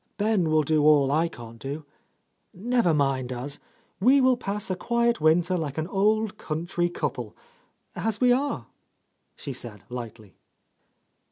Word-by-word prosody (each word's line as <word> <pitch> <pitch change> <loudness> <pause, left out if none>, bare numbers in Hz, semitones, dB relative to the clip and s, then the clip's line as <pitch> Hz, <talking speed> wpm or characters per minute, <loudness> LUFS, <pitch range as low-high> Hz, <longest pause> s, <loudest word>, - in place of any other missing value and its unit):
Ben 205 -5 +1
will 155 0 +3
do 155 0 +2
all 145 -3 +5
I 160 +3 +2
can't 115 -7 -11
do. 145 +4 -6 0.7
Never 230 -1 +1
mind 135 -4 0
us. 130 +3 -5 0.4
We 255 +8 +5
will 255 -1 +4
pass 205 -4 -4
a - - 0
quiet 235 +2 0
winter, 170 +3 +3
like 155 -5 -3
an 160 - -1
old 210 +3 +1
country 175 +2 -2
couple,' - - -4 0.3
— - - -44 0.2
as 220 -2 -2
we 250 -1 +4
are 280 +3 0 0.4
!" - - -48
she 140 - -6
said 110 -6 -8
lightly. 115 -5 -8
165 Hz, 155 wpm, -26 LUFS, 140-215 Hz, 0.7 s, all